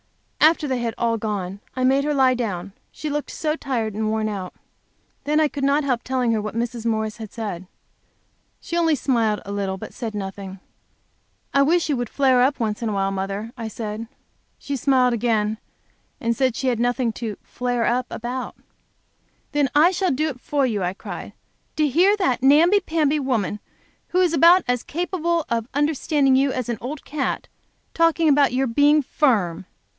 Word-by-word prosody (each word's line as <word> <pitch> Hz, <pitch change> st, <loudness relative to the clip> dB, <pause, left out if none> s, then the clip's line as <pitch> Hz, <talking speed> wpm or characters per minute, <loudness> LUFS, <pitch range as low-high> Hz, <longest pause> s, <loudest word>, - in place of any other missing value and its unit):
After 310 Hz, 0 st, +4 dB
they 260 Hz, -2 st, -1 dB
had 235 Hz, -1 st, -2 dB
all 230 Hz, -1 st, +1 dB
gone, 200 Hz, -3 st, -4 dB
I 255 Hz, -, -1 dB
made 270 Hz, +2 st, +3 dB
her 300 Hz, +1 st, 0 dB
lie 265 Hz, -2 st, +4 dB
down, 200 Hz, -6 st, -4 dB, 0.2 s
she 310 Hz, -, -5 dB
looked 295 Hz, 0 st, -3 dB
so 310 Hz, -1 st, -2 dB
tired 235 Hz, -8 st, -2 dB
and 215 Hz, +1 st, -1 dB
worn 220 Hz, 0 st, 0 dB
out. 195 Hz, -4 st, -5 dB, 0.7 s
Then, 300 Hz, +1 st, +2 dB
I 310 Hz, -, +4 dB
could 285 Hz, -1 st, -6 dB
not 280 Hz, +2 st, +3 dB
help 250 Hz, -4 st, 0 dB
telling 255 Hz, -2 st, 0 dB
her 220 Hz, -2 st, +1 dB
what 215 Hz, +1 st, -5 dB
Mrs. 235 Hz, 0 st, -3 dB
Morris 220 Hz, -1 st, -1 dB
had 220 Hz, -3 st, -8 dB
said. 200 Hz, -6 st, -5 dB, 0.9 s
She 340 Hz, -, -6 dB
only 330 Hz, -2 st, +3 dB
smiled 230 Hz, -5 st, 0 dB
a 200 Hz, -, -6 dB
little, 195 Hz, -1 st, -2 dB
but -, -, -9 dB
said 225 Hz, -4 st, -5 dB
nothing. 195 Hz, -1 st, -6 dB, 0.9 s
"I 275 Hz, -, +4 dB
wish 330 Hz, +5 st, +3 dB
you 295 Hz, -, +1 dB
would 240 Hz, -2 st, -3 dB
ever -, -, -30 dB
flare 260 Hz, -3 st, +4 dB
up, 270 Hz, +3 st, +2 dB
mother," 205 Hz, -1 st, -2 dB
I 230 Hz, -3 st, -5 dB
said. 220 Hz, 0 st, -5 dB, 0.5 s
She 285 Hz, -, -4 dB
smiled 255 Hz, -2 st, +3 dB
again, 220 Hz, -2 st, 0 dB, 0.6 s
and 235 Hz, 0 st, 0 dB
said 260 Hz, -2 st, +1 dB
she 265 Hz, -, -2 dB
had 240 Hz, -3 st, +1 dB
nothing 245 Hz, -1 st, 0 dB
to 220 Hz, -3 st, -5 dB
"flare 245 Hz, -2 st, -2 dB
up" 250 Hz, +1 st, 0 dB
about. 250 Hz, +2 st, -5 dB, 1.0 s
"Then 290 Hz, -3 st, +1 dB
I 320 Hz, +5 st, +6 dB
shall 375 Hz, 0 st, 0 dB
do 300 Hz, +4 st, 0 dB
it 255 Hz, -4 st, -8 dB
for 285 Hz, -2 st, 0 dB
you!" 215 Hz, -5 st, -1 dB
I 180 Hz, +1 st, -1 dB
cried. -, -, -8 dB, 0.4 s
"To 305 Hz, -1 st, +2 dB
hear 365 Hz, +9 st, +4 dB
that 260 Hz, -, +1 dB
namby 325 Hz, +9 st, +6 dB
pamby 310 Hz, -4 st, +1 dB
woman, 225 Hz, -7 st, -1 dB, 0.5 s
who 360 Hz, -, 0 dB
is 360 Hz, -3 st, +3 dB
about 335 Hz, +3 st, +6 dB
as 245 Hz, -1 st, +1 dB
capable 340 Hz, -1 st, -1 dB
of 230 Hz, 0 st, -2 dB
understanding 290 Hz, -2 st, +2 dB
you 270 Hz, +1 st, +3 dB
as 255 Hz, -2 st, -3 dB
an 230 Hz, -2 st, -2 dB
old 275 Hz, +4 st, -6 dB
cat, 290 Hz, -2 st, -3 dB, 0.5 s
talking 330 Hz, -1 st, +3 dB
about 285 Hz, -2 st, +4 dB
your 260 Hz, +2 st, +1 dB
being 290 Hz, +5 st, +4 dB
firm! 200 Hz, -, +1 dB
250 Hz, 180 wpm, -22 LUFS, 220-290 Hz, 1.0 s, I